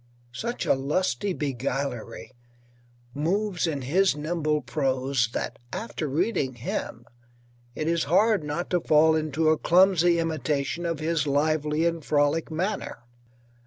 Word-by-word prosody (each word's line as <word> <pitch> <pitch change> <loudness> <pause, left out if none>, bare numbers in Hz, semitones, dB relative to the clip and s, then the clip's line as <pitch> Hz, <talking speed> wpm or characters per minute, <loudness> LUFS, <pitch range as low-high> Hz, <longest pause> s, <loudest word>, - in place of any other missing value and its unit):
Such 235 - -3
a - - +4
lusty 150 - -1
beguilery 135 -6 -4 0.8
moves 180 +5 0
in 145 -4 -3
his 175 +5 +2
nimble 155 0 -1
prose 130 -1 0
that - - -4
after 170 -6 -4
reading 145 - 0
him 115 0 -5 0.7
it 155 - -3
is 170 0 +1
hard 205 +4 +3
not 150 +4 -4
to 180 -2 +2
fall 160 0 +4
into 155 0 +1
a 155 - +2
clumsy 175 -1 +4
imitation 160 0 -1
of 165 -2 -2
his 155 -2 0
lively 150 +2 +1
and 170 -2 -1
frolic 145 +2 +1
manner. 170 - -3
155 Hz, 125 wpm, -26 LUFS, 140-170 Hz, 0.8 s, a